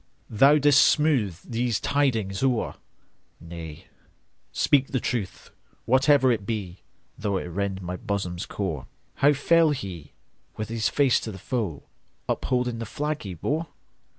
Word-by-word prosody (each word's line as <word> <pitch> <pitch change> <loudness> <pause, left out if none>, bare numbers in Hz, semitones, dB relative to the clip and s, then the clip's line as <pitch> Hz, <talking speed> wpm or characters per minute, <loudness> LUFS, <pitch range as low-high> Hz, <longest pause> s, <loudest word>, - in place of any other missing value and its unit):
Thou 135 +7 +6
'dst 145 -1 +5
smooth 135 - +3
these 120 -2 -1
tidings 115 -9 0
o'er,—Nay, 85 - -5 0.7
speak 135 -2 +2
the 130 - -1
truth, 115 -7 -4 0.3
whatever 130 +1 +4
it 110 -4 -1
be, 100 -5 -4 0.4
Though 100 -2 -1
it - - -4
rend 95 +2 -3
my 90 +1 -4
bosom's 100 -4 -3
core."How 95 - -1
fell 165 +3 +4
he,—with 100 - -7
his 115 -1 0
face 140 -4 +3
to 110 - -6
the 95 - -9
foe, 100 - -3 0.4
Upholding 125 -2 -1
the 115 - -5
flag 150 +6 -3
he 95 -3 -6
bore? 155 - -2
115 Hz, 125 wpm, -25 LUFS, 95-135 Hz, 0.7 s, Thou